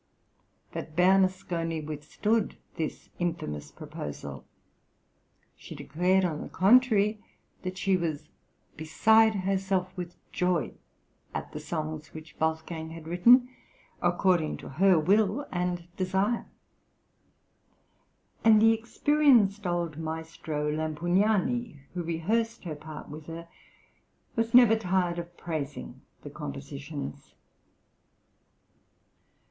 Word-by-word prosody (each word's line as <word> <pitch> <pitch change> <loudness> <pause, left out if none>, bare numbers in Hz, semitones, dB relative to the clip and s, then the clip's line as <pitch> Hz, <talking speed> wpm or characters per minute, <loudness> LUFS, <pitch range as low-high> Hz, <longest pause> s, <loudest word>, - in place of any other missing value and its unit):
But 155 +1 -7
Bernasconi 180 -3 +2
withstood 155 +9 -1 0.2
this 160 -3 -4
infamous 165 - -3
proposal. 75 -1 -7 1.1
She - - -11
declared, 180 +5 +1
on 155 -4 -2
the - - -7
contrary, 215 0 +4 0.4
that 185 0 -5
she 195 0 +2
was 160 -4 -2 0.5
"beside 220 +8 +4
herself 190 -1 -1
with 175 -2 -6 0.2
joy" 180 -6 0 0.6
at - - -4
the 150 - -6
songs 155 -1 -5
which 155 0 -10
Wolfgang 160 0 -2
had 165 -1 -9
written 235 +9 +6 0.5
"according 175 -2 +2
to - - -10
her 185 +5 +4
will 205 - +2
and 180 -1 -1
desire"; 190 +5 0 2.0
and 220 -1 +7
the 225 +1 +6
experienced 230 -4 +3
old 170 -3 -2
maestro 160 -2 -3
Lampugnani, 180 - 0
who 180 - -3
rehearsed 215 +8 -1
her 170 -4 -4
part 155 +1 -9
with 150 +1 -9
her, 165 +1 -7 0.9
was 230 +1 +1
never 240 -3 +8
tired 180 -4 0
of 170 0 -9
praising 145 -5 -5 0.2
the 145 - -8
compositions. 140 - -7
175 Hz, 100 wpm, -28 LUFS, 155-200 Hz, 2.0 s, never